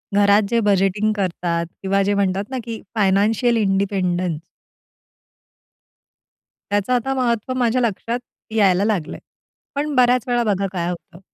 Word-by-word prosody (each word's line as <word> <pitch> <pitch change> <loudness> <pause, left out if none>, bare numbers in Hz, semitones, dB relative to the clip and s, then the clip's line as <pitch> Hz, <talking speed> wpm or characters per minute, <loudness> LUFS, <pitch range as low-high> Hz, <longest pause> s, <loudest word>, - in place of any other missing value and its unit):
घरात 205 +1 +5
जे 235 0 +2
बजेटिंग 200 +1 +2
करतात 175 -3 -1 0.2
किंवा 195 +1 +1
जे 200 +1 +1
म्हणतात 200 0 0
ना 260 - -4
की 225 -1 -6
फायनान्शियल 215 +4 +2
इंडिपेंडन्स 190 -5 0 2.3
त्याचं 205 +4 +1
आता 250 +2 0
महत्त्व 245 -2 -1
माझ्या 245 +1 +2
लक्षात 230 +1 -1 0.4
यायला 195 -2 +3
लागलंय. 205 -8 -2 0.6
पण 295 +1 -1
बऱ्याच 250 -1 +4
वेळा 240 -1 +1
बघा 200 -3 0
काय 175 -2 -2
होतं. 170 -1 -8
205 Hz, 125 wpm, -20 LUFS, 190-235 Hz, 2.3 s, घरात